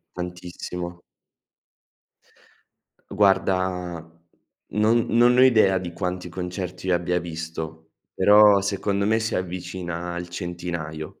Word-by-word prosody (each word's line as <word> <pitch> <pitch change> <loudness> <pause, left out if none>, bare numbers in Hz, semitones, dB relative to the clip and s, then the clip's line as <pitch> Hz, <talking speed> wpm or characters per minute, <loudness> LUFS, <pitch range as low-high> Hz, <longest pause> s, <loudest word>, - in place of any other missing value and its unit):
Tantissimo. 90 0 -6 2.1
Guarda, 95 -3 +1 0.8
non 110 +2 +3
non 120 +1 +5
ne 125 - +5
ho - - +8
idea, 110 -7 +5
di 90 -2 -6
quanti 90 0 -4
concerti 90 +1 -5
io 90 - +3
abbia 90 +1 0
visto. 80 -1 -7 0.2
Però 105 +1 +6
secondo 100 0 -1
me, 110 +1 +2
si 110 - -2
avvicina 90 -1 -4
al 85 0 -5
centinaio. 85 -3 -6
90 Hz, 105 wpm, -24 LUFS, 85-100 Hz, 2.1 s, ho